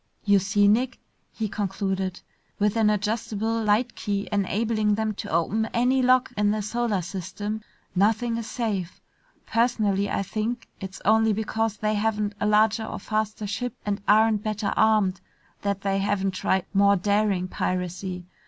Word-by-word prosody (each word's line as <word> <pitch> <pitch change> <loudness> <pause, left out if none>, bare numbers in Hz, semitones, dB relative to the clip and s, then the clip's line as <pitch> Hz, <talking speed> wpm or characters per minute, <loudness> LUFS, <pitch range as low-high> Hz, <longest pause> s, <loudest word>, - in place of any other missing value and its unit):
"You 205 -2 +4
see, 200 +1 +2
Nick," 245 +5 +2 0.3
he 220 - -3
concluded, 195 -2 -2 0.4
"with 210 +1 +1
an 220 -2 +4
adjustable 220 +1 -1
light 220 +3 +2
key 200 -1 -3
enabling 210 +1 +1
them 220 0 -1
to - - -7
open 200 +7 +1
any 250 +3 +3
lock 255 0 +3
in 210 0 +2
the 210 0 0
solar 215 -3 -1
system, 200 +4 -5 0.3
nothing 225 +4 +2
is 230 -1 -5
safe. 200 -7 -3 0.5
Personally, 215 -4 +1
I - - 0
think 225 +4 -3
it's 190 -1 -8
only 220 +1 +4
because 220 0 -1
they 215 +1 0
haven't 210 -1 0
a 210 - +1
larger 215 +1 +3
or - - -5
faster 215 +1 -2
ship 220 +4 -3
and 200 -1 -1
aren't 215 0 +4
better 210 -1 -2
armed 210 -4 +3 0.4
that 200 -1 -1
they 195 0 0
haven't 195 -1 0
tried 190 0 0
more 200 0 +5
daring 200 -1 +1
piracy. 180 0 -3
210 Hz, 155 wpm, -25 LUFS, 195-220 Hz, 0.5 s, more